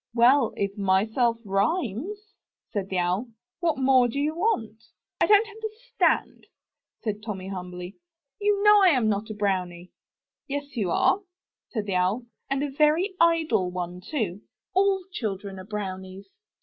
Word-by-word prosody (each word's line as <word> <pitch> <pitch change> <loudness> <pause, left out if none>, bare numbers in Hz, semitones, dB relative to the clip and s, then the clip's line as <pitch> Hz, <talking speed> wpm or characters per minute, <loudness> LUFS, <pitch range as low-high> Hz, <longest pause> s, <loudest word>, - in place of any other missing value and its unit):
"Well, 245 +1 +5
if 200 0 -1
'myself* 220 +5 +2
rhymes," 285 - -1 0.4
said 200 -3 -3
the 190 - -2
Owl, 180 +7 0 0.3
"what 330 -4 +1
more 260 -2 +4
do 240 - -5
you 295 +2 0
want? 230 - -1 0.4
"I - - +5
don't 420 +1 +6
understand," 445 +2 -1 0.6
said 210 -2 -2
Tommy 195 -3 -5
humbly, 180 0 -7 0.4
"you 410 -1 +1
know 420 -1 +7
I'm 265 - +4
not 210 +1 -1
a 215 - -5
brownie." 180 -3 -2 0.6
"Yes 285 0 -5
you 205 -6 0
are, 380 - +3 0.5
said 215 -4 -3
the 200 - -2
Owl, 195 +7 0 0.2
"and 275 +1 0
a 290 - -2
very 305 +7 +2
idle 320 - +3
one, 180 0 -5
too. 205 - -3 0.3
All 385 0 +3
children 200 - -4
are 185 - -9
brownies. 190 -2 -6
225 Hz, 145 wpm, -26 LUFS, 195-315 Hz, 0.6 s, know